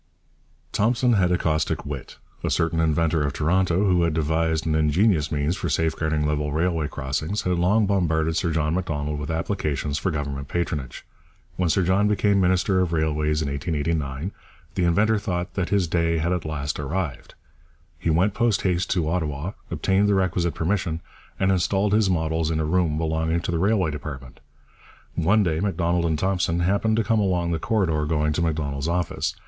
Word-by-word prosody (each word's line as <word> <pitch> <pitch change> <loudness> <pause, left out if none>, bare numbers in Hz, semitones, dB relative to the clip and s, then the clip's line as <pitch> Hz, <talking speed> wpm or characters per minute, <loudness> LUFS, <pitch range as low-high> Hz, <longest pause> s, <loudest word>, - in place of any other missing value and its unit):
Thompson 120 +3 +2
had 90 -4 +3
a 90 - +3
caustic 80 -2 -1
wit. 70 -3 -7 0.3
A - - 0
certain 80 0 +1
inventor 80 0 +2
of 70 -1 -1
Toronto, 90 +5 +1
who 90 -3 +3
had 85 -2 +1
devised 80 0 0
an 80 - +1
ingenious 80 +2 +2
means 75 +3 0
for 90 -3 -3
safeguarding 80 0 0
level 75 0 -1
railway 80 0 0
crossings, 75 +8 -3
had 90 -1 0
long 105 +5 +3
bombarded 80 -5 +1
Sir 85 - 0
John 80 -1 0
Macdonald 75 -5 -2
with 75 +1 -5
applications 80 -4 -2
for - - -1
Government 70 -3 -4
patronage. 75 -7 -3 0.5
When 90 -2 0
Sir 95 +4 +2
John 95 +4 +2
became 100 -1 +2
minister 95 +1 +2
of 90 -2 0
Railways 75 -1 0
in - - -3
1889, 75 +1 -2 0.4
the 90 - 0
inventor 105 +6 +3
thought 90 -3 -3
that 95 -2 -2
his 95 -3 +2
day 85 0 +1
had 85 +3 0
at 90 -3 -3
last 75 -2 -3
arrived. 75 -2 -4 0.6
He - - -1
went 90 +6 +2
post 115 -2 +1
haste 90 -1 0
to 85 -5 0
Ottawa, 80 0 -2 0.2
obtained 100 +2 +1
the 100 - +3
requisite 90 -2 0
permission, 85 -2 -1 0.4
and 95 0 +3
installed 95 +2 +1
his 105 -2 +3
models 80 -2 0
in 80 -1 0
a 80 - 0
room 80 -2 +1
belonging 80 +1 0
to 85 - -3
the 85 - 0
Railway 95 -3 +2
department. 70 -3 -8 0.7
One 95 +6 +3
day 80 -4 0
Macdonald 85 -3 0
and 80 -2 0
Thompson 90 -1 0
happened 100 +5 +1
to 115 - +2
come 110 +2 +1
along 90 -4 +1
the 80 - -1
corridor 95 -9 0
going 75 -1 +1
to 85 - -1
Macdonald's 75 -3 -1
office. 85 0 -1
85 Hz, 180 wpm, -24 LUFS, 75-95 Hz, 0.7 s, had